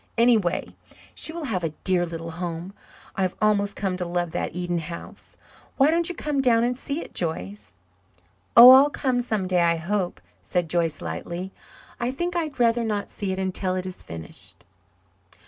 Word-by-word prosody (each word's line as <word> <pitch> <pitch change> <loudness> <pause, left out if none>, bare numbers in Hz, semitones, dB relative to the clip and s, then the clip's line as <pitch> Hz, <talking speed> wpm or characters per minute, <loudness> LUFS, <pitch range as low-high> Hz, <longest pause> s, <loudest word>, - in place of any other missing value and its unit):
Anyway, 225 -7 +2 0.4
she - - -1
will 335 0 -6
have 205 -10 -2
a 165 - 0
dear 180 -2 +2
little 165 0 -6
home. 175 +2 -5 0.4
I've 185 -2 -1
almost 205 -1 +2
come 190 -2 -2
to 180 - -3
love 175 -1 -2
that - - -3
Eden 175 -1 -1
house. 170 +1 -10 0.4
Why 280 +2 +5
don't 335 +1 +2
you 355 - -5
come 295 -3 -1
down 235 -3 +3
and 245 +1 0
see 280 +5 -4
it, - - -10
Joyce?" 105 - -4 0.8
"Oh, 245 +2 +12
I'll 270 +3 +8
come 260 -4 0
some 220 -5 -2
day 180 -1 +2
I 170 0 +3
hope," 180 +2 -2 0.2
said 170 - -2
Joyce 165 -3 0
lightly. 170 - -5 0.5
"I 240 0 -1
think 345 +7 -3
I'd 310 -6 -3
rather 235 0 +3
not 210 -2 -2
see 200 -2 -3
it 190 - -3
until 185 0 -1
it 185 0 -3
is 185 -1 -6
finished." 80 -1 -10
190 Hz, 180 wpm, -24 LUFS, 170-245 Hz, 0.8 s, Oh